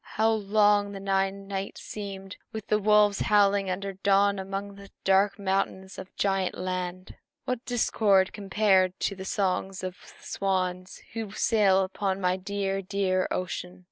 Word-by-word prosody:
How 220 +1 +4
long 205 -1 +2
the 195 - -6
nine 195 0 -1
nights 195 0 -5
seemed, 195 -2 -7
with 220 -2 -6
the 210 - +3
wolves 210 -1 +4
howling 200 -2 +3
until 195 +2 -3
dawn 200 0 +3
among 195 +1 -5
the 200 0 -13
dark 195 +1 +3
mountains 190 -1 -2
of 190 0 -10
Giant 195 -2 0
Land! 185 0 -4 0.3
What 255 -2 -1
a - - -45
discord 205 -5 +2
compared 195 -2 +2
to 200 - 0
the 190 0 -8
songs 190 -1 -1
of 185 -1 -3
the - - -17
swans 185 -1 -2
who 225 -2 -4
sail 200 -4 +3
upon 190 0 -2
my 180 -1 +1
dear, 195 +1 -2
dear 185 -1 0
ocean!" 180 +1 -4
195 Hz, 155 wpm, -27 LUFS, 190-205 Hz, 0.3 s, How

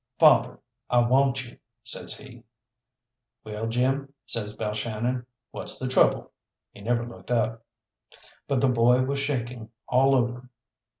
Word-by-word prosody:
"Father, - - +5 0.3
I 125 - +2
want 135 +2 +2
you," 120 - -15 0.2
says - - -6
he. 120 -4 -13 1.0
"Well, 110 +1 -4
Jim," 135 +4 0
says 105 -2 -3
Balshannon, 115 +4 -2 0.2
"what's - - -3
the 130 - -3
trouble?" 130 - +3 0.4
He 100 - -14
never 120 +2 0
looked 120 - -12
up. 115 -1 0 0.8
But 135 -3 +1
the 135 - +4
boy 125 +1 +4
was 140 +2 -1
shaking 125 -5 -3 0.2
all 135 +2 +4
over. 125 0 -1
120 Hz, 130 wpm, -26 LUFS, 115-130 Hz, 1.0 s, Father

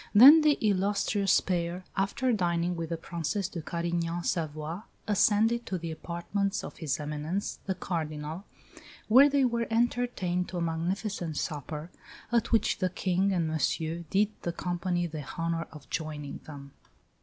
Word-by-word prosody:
Then 280 +9 +11
the 300 -1 +4
illustrious 200 0 +2
pair, 175 0 -2
after 235 +6 +1
dining 175 -3 +1
with 165 -1 -4
the 165 - -2
Princesse 170 +4 -2
de 180 -4 -6
Carignan 170 +1 -2
Savoie, 155 +1 -2 0.3
ascended 220 +3 +3
to 185 - -1
the 165 -1 -5
apartments 195 +5 -2
of - - -8
his 155 -5 -2
Eminence, 150 +6 -3
the 190 - 0
Cardinal, 160 0 -4 0.6
where 265 +6 +8
they 280 -2 +3
were 235 -1 0
entertained 225 -6 0
to 180 - -5
a - - -1
magnificent 170 0 -2
supper, 150 +2 -4 0.4
at 235 -1 +1
which 225 - +2
the 185 - +1
King 185 +1 +1
and 175 -4 +1
Monsieur 160 +1 -1
did 205 +2 +3
the 170 - -2
company 175 0 -1
the 155 -3 -5
honour 165 -1 -1
of 150 -3 -12
joining 150 -3 -4
them." 140 -2 -9
175 Hz, 150 wpm, -29 LUFS, 165-200 Hz, 0.6 s, Then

